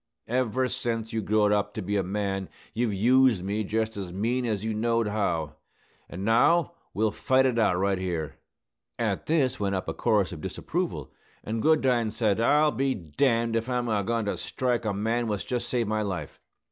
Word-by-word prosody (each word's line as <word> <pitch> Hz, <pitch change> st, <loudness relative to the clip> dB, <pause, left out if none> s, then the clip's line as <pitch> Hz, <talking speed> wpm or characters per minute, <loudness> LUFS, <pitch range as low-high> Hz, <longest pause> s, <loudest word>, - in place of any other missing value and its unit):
Ever 125 Hz, +1 st, +1 dB
sence 115 Hz, -2 st, -3 dB
you 110 Hz, -, 0 dB
growed 105 Hz, 0 st, +2 dB
up 105 Hz, 0 st, 0 dB
to 110 Hz, -, -3 dB
be 100 Hz, +3 st, -2 dB
a 100 Hz, -, +2 dB
man 95 Hz, 0 st, -2 dB, 0.2 s
you've 115 Hz, -1 st, 0 dB
used 120 Hz, 0 st, +4 dB
me 105 Hz, +3 st, -1 dB
just 110 Hz, +2 st, -1 dB
as 95 Hz, -3 st, -5 dB
mean 120 Hz, +6 st, -1 dB
as 105 Hz, -2 st, -2 dB
you 110 Hz, -, -1 dB
knowed 115 Hz, +1 st, +1 dB
how; 85 Hz, -8 st, -1 dB, 0.5 s
an' 95 Hz, +3 st, -6 dB
now 160 Hz, +11 st, +3 dB, 0.2 s
we'll 110 Hz, +1 st, +1 dB
fight 130 Hz, +4 st, +2 dB
it 125 Hz, -3 st, +1 dB
out 95 Hz, -5 st, +3 dB
right 95 Hz, 0 st, +1 dB
here." 85 Hz, -5 st, -3 dB, 0.6 s
At -, -, -2 dB
this 135 Hz, -5 st, +1 dB
went 100 Hz, -1 st, 0 dB
up 95 Hz, -, -3 dB
a -, -, -2 dB
chorus 105 Hz, -4 st, +1 dB
of 80 Hz, -4 st, -7 dB
disapproval: -, -, -3 dB, 0.3 s
and 110 Hz, +1 st, -3 dB
Goodine 130 Hz, -7 st, +3 dB
said, 110 Hz, -2 st, 0 dB
"I'll 150 Hz, +5 st, +4 dB
be 135 Hz, -1 st, 0 dB
d 80 Hz, -7 st, -12 dB
d -, -, +3 dB, 0.3 s
if 115 Hz, +2 st, -1 dB
I'm 125 Hz, -1 st, 0 dB
a 105 Hz, -2 st, +1 dB
goin 115 Hz, +1 st, -1 dB
to 100 Hz, -, -2 dB
strike 125 Hz, -3 st, -1 dB
the 110 Hz, -3 st, -1 dB
man 115 Hz, +3 st, 0 dB
what's 105 Hz, -2 st, -2 dB
jest 125 Hz, -1 st, -3 dB
saved 120 Hz, -3 st, 0 dB
my 110 Hz, 0 st, 0 dB
life!" 95 Hz, -8 st, -4 dB
110 Hz, 195 wpm, -27 LUFS, 100-120 Hz, 0.6 s, used